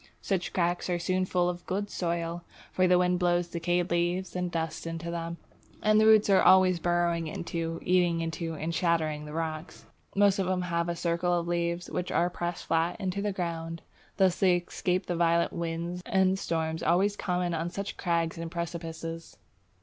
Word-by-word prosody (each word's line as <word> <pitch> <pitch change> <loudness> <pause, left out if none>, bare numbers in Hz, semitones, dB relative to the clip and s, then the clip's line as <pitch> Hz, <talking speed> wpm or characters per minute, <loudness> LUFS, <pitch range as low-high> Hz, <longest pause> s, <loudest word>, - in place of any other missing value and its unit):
Such 190 -3 -1
cracks 175 0 0
are 175 - +1
soon 185 +2 0
full 180 -1 +1
of 175 0 -3
good 205 +2 -2
soil, 170 -1 -2 0.3
for 185 0 +2
the 180 0 +5
wind 180 0 +2
blows 175 -1 +1
decayed 175 +1 -1
leaves 175 +2 0
and 180 0 -1
dust 165 -1 -3
into 165 +1 -4
them, 170 0 -4 0.5
and 215 0 +5
the 220 - +5
roots 220 -1 +6
are 195 -2 +5
always 185 -1 +6
burrowing 170 -1 +1
into, 165 0 -4
eating 175 -2 +2
into, 165 0 -3
and 160 +2 -3
shattering 160 -3 0
the 150 - -8
rocks. 160 0 -5 0.3
Most 200 -1 +4
of 190 - 0
them 185 -1 0
have 170 -1 -1
a 170 - -1
circle 175 +1 0
of 170 - -5
leaves 170 0 -1
which 180 - -3
are 175 +1 +2
pressed 175 0 -4
flat 165 +1 +1
to 200 +2 -3
the 205 0 0
ground. 165 -3 -4 0.3
Thus 190 -3 +3
they 185 -2 +5
escape 180 +1 -1
the 175 - -2
violent 170 0 +2
winds 170 +1 -3
and 190 0 +2
storms 160 -2 -2
always 190 +5 +2
common 180 -3 -1
on 165 +1 -2
such 200 +3 -5
crags 170 -2 -1
and 165 0 -4
precipices. 165 -1 -6
175 Hz, 185 wpm, -29 LUFS, 165-180 Hz, 0.5 s, roots